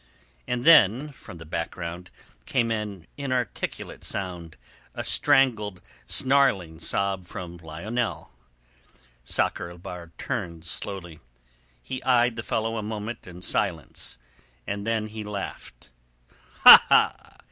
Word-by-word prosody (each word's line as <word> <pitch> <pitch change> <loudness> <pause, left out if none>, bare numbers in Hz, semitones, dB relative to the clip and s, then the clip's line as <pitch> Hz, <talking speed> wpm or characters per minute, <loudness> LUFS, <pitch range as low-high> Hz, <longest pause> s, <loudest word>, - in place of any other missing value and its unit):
And 125 +1 -2
then 140 - +6
from 90 -9 -13
the 80 - -11
background 85 +2 -5 0.4
came 120 -4 +1
an 105 -6 -4
inarticulate 130 -4 -4
sound, 85 -5 -4 0.4
a - - -4
strangled, 105 -8 +3 0.3
snarling 105 - +3
sob 95 +1 -1
from 90 0 -8
Lionel. 95 +9 -4 0.9
Sakr 85 - -1
el 85 - -12
Bahr 85 -1 -9
turned 85 -1 -5
slowly. 85 -3 -5 0.6
He 130 - -5
eyed 120 -2 +3
the 110 - -4
fellow 115 0 -2
a - - -2
moment 105 +1 -6
in 90 0 -11
silence, 80 -9 -2 0.5
then 105 +2 -2
he 110 0 -7
laughed. 105 -1 -8 0.7
"Ha! - - +7
100 Hz, 110 wpm, -25 LUFS, 85-115 Hz, 0.9 s, Ha